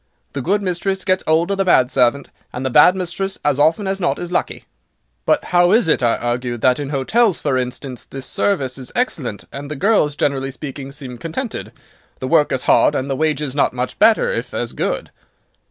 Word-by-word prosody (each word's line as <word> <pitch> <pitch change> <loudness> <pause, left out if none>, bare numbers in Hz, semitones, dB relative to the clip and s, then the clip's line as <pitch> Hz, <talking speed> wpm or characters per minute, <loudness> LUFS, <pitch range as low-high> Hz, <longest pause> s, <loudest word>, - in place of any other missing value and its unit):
The 140 - -3
good 200 +8 0
mistress 190 +1 -2
gets 185 0 +1
'old 165 +4 +2
of 195 - -2
the - - +3
bad 130 -8 +4
servant, 130 +2 +1 0.2
and 125 +2 -5
the 130 - -1
bad 150 +8 +6
mistress, 190 +1 -3
as 145 -1 +2
often 160 +7 +3
as 195 0 -2
not 175 - 0
is 175 0 -6
lucky." - - -2 0.6
"But 300 - +3
how 175 0 +5
is 225 -5 +4
it," 150 - +2
I 120 -2 +2
argued, 120 0 -3
"that 130 +2 +3
in 145 -2 -4
hotels, 185 - +1
for 140 -3 -1
instance, 125 0 -4
the 135 -1 -8
service 135 -4 -1
is 130 - -7
excellent, 145 - -2
and 140 +1 -7
the 150 - -4
girls, 150 -3 +2
generally 135 -2 -1
speaking, 140 0 -7
seem 130 -4 -8
contented? 185 - -5 0.5
The 130 - -4
work 155 0 +3
is 130 - -1
hard, 145 - +4
and 135 +1 -2
the - - 0
wages 150 -2 -1
not 145 - +2
much 125 0 -4
better, 225 -1 +4
if 120 +1 -4
as 120 -1 -3
good." - - -3
145 Hz, 205 wpm, -19 LUFS, 130-180 Hz, 0.6 s, bad